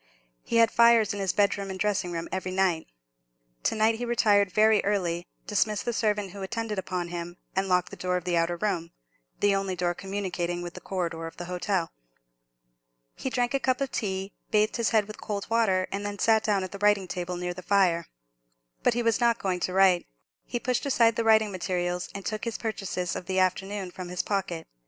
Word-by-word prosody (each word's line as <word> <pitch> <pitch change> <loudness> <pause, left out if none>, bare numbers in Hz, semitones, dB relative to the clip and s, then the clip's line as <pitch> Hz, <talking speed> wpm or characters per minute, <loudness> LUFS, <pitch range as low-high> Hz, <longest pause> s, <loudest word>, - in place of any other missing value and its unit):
He - - -4
had 230 -1 +5
fires 235 -3 +5
in 205 - -5
his 195 -2 +1
bedroom 200 -1 +1
and 190 0 -5
dressing 200 -4 0
room 165 -1 -4
every 185 0 -2
night. 185 -4 +1 0.7
To - - 0
night 220 +1 +2
he - - -3
retired 205 -5 +3
very 215 +1 +4
early, 175 -4 -1 0.2
dismissed 210 -1 0
the 240 - -1
servant 210 -4 0
who 200 +1 -9
attended 215 +1 -3
upon 180 -2 -3
him, 175 0 -6 0.2
and 190 0 +1
locked 180 0 +2
the - - -7
door 180 0 -1
of 180 - -5
the 175 -1 0
outer 170 +1 +1
room, 170 -4 -1 0.5
the 205 -1 +4
only 195 -1 -1
door 175 0 0
communicating 180 -2 -3
with 175 -1 -6
the - - -9
corridor 165 -3 -3
of 165 - -11
the 175 - -5
hotel. 180 -1 -1 1.2
He - - -4
drank 245 0 0
a 275 - +2
cup 255 -1 +1
of 275 -2 -2
tea, 195 -1 -3 0.2
bathed 215 0 +2
his 235 -2 +1
head 215 -3 +3
with 215 +1 -10
cold 200 -2 -4
water, 195 -5 +2
and 200 +1 -3
then 205 0 -4
sat 220 +2 +3
down 205 -3 +1
at 185 - -6
a 200 - -7
writing 205 -2 +3
table 180 0 -4
near 180 0 -3
the 185 - -9
fire. 180 -3 +2 0.7
But 235 - +2
he 240 - 0
was 230 -2 +2
not 235 -1 +3
going 185 -4 -1
to 180 - -2
write; 190 -2 +4 0.4
he 240 - -2
pushed 250 +3 -1
aside 230 -4 +4
the 230 - 0
writing 220 -1 +4
materials, 180 -1 -2
and 200 - -6
took 215 +1 -3
his 230 -1 -2
purchases 195 -5 -3
of 180 - -6
the 190 0 -1
afternoon 190 +1 0
from 180 0 -7
his 180 0 -2
pocket. 185 -5 -2
195 Hz, 210 wpm, -27 LUFS, 180-215 Hz, 1.2 s, had